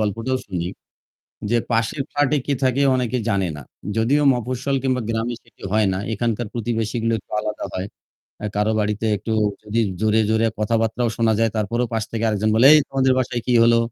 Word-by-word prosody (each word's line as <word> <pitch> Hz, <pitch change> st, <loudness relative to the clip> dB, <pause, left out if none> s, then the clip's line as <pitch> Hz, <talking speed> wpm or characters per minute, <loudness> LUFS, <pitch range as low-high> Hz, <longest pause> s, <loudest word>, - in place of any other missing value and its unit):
গল্পটাও 115 Hz, +5 st, -1 dB
শুনি। 90 Hz, -3 st, -3 dB, 0.8 s
যে 120 Hz, -, +3 dB
পাশের 115 Hz, +4 st, 0 dB
ফ্ল্যাটে 145 Hz, 0 st, +2 dB
কে 145 Hz, -, 0 dB
থাকে 130 Hz, +1 st, +2 dB
অনেকে 125 Hz, -1 st, -1 dB
জানে 100 Hz, -3 st, +1 dB
না। 75 Hz, -, -8 dB, 0.4 s
যদিও 135 Hz, +7 st, +2 dB
মফস্বল 130 Hz, +3 st, -2 dB
কিংবা 130 Hz, -2 st, +1 dB
গ্রামে 115 Hz, +1 st, -1 dB
সেটি 115 Hz, -, -21 dB
হয় 110 Hz, -1 st, +3 dB
না। 95 Hz, -, -2 dB
এখানকার 115 Hz, +1 st, -1 dB
প্রতিবেশীগুলো 115 Hz, 0 st, -1 dB
একটু -, -, -25 dB
আলাদা 105 Hz, 0 st, -4 dB
হয়। 95 Hz, +1 st, -3 dB, 0.5 s
এ্যা 105 Hz, -, -3 dB
কারো 105 Hz, +1 st, +2 dB
বাড়িতে 105 Hz, +1 st, -1 dB
একটু 110 Hz, +3 st, -4 dB, 0.3 s
যদি 105 Hz, +2 st, 0 dB, 0.2 s
জোরে, 110 Hz, 0 st, +3 dB
জোরে, 110 Hz, +1 st, +2 dB
কথাবার্তাও 115 Hz, +2 st, 0 dB
শোনা 115 Hz, -1 st, +2 dB
যায় 115 Hz, 0 st, +2 dB
তারপরও 115 Hz, +4 st, 0 dB
পাশ 110 Hz, -, 0 dB
থেকে 115 Hz, 0 st, -2 dB
আরেকজন 110 Hz, 0 st, +1 dB
বলে, 115 Hz, +4 st, +6 dB
"এই 155 Hz, -, +7 dB
তোমাদের 135 Hz, -1 st, +2 dB
বাসায় 120 Hz, -2 st, -1 dB
কি 125 Hz, -, +2 dB
হলো? 115 Hz, 0 st, +5 dB
115 Hz, 180 wpm, -21 LUFS, 110-125 Hz, 0.8 s, এই